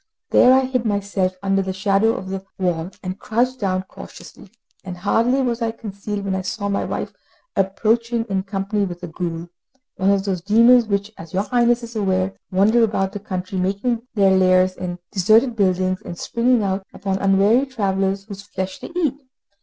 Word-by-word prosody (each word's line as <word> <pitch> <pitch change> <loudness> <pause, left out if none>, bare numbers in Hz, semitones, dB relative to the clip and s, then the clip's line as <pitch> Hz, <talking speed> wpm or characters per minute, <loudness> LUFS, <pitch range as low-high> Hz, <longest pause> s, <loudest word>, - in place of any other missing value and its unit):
There 250 - +6
I 260 +1 +6
hid 255 -2 -1
myself 200 -3 -1
under 195 0 +2
the 190 0 -3
shadow 200 +3 +2
of 190 - -6
the 190 0 -4
wall, 175 -3 -1
and 185 +2 -5
crouched 250 +4 0
down 185 -2 0
cautiously; - - -13 0.3
and 180 -1 -7
hardly 230 +8 +2
was 240 -1 -1
I 230 - +1
concealed, 205 -2 -6
when 195 - -1
I 190 - -1
saw 200 +2 -3
my 200 - 0
wife - - -4 0.4
approaching 225 +4 +1
in 195 -1 0
company 195 +1 -2
with 175 -2 -5
a - - -4
ghoul 170 0 -5 0.5
one 190 +1 +2
of 200 -1 +2
those 190 -3 -1
demons 230 +4 +5
which, 200 0 -1
as 165 +1 -9
your 195 - +2
Highness 240 +1 +2
is 235 0 -9
aware, 190 -2 0 0.2
wander 205 +5 +3
about 195 -3 0
the 205 - -6
country 185 -1 -4
making 200 +6 -1
their 195 -2 +4
lairs 185 0 +4
in 180 -1 -5
deserted 220 +6 +3
buildings 185 -2 +1
and 170 - -8
springing 235 +2 +1
out 195 0 -1
upon 195 -1 -3
unwary 200 +7 +3
travellers 195 -5 -1
whose 200 -1 -9
flesh 190 -2 -5
they - - -8
eat. 295 -5 0
200 Hz, 185 wpm, -21 LUFS, 190-225 Hz, 0.5 s, There